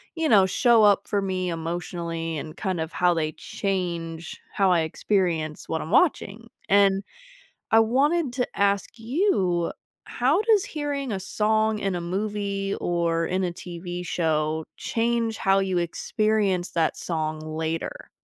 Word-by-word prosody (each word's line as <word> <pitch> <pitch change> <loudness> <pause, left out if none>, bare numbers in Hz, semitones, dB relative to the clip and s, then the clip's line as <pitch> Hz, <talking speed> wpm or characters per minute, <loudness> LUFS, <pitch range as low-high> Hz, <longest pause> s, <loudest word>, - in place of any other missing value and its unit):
you 325 -1 0
know, 200 -5 +6
show 230 +4 +4
up 205 -2 +4
for 205 - 0
me 185 -2 -2
emotionally, 165 0 -4
and 155 +2 -7
kind 190 -4 -2
of 160 +1 -3
how 180 0 +3
they 155 -1 0
change 170 -4 -4
how 195 -2 +3
I 170 - +4
experience 160 -2 -1
what 160 - -2
I'm 160 - -6
watching. 230 - +1 0.2
And, 195 0 +4 0.7
I 225 - +6
wanted 275 +6 +2
to 250 -2 0
ask 200 +2 +1
you, 225 - +1 0.3
how - - +1
does 435 -3 +3
hearing 290 - -3
a 195 - -2
song 215 +2 +1
in 195 -3 -1
a 175 - -3
movie 200 +2 -2
or 170 -1 0
in 185 +3 -1
a 180 - -1
TV 175 0 -7
show 160 -2 0
change 230 -1 0
how 195 0 +3
you 190 -2 0
experience 195 +2 0
that 165 -2 +1
song 155 -2 -3
later? 160 +1 -4
190 Hz, 150 wpm, -25 LUFS, 170-215 Hz, 0.7 s, know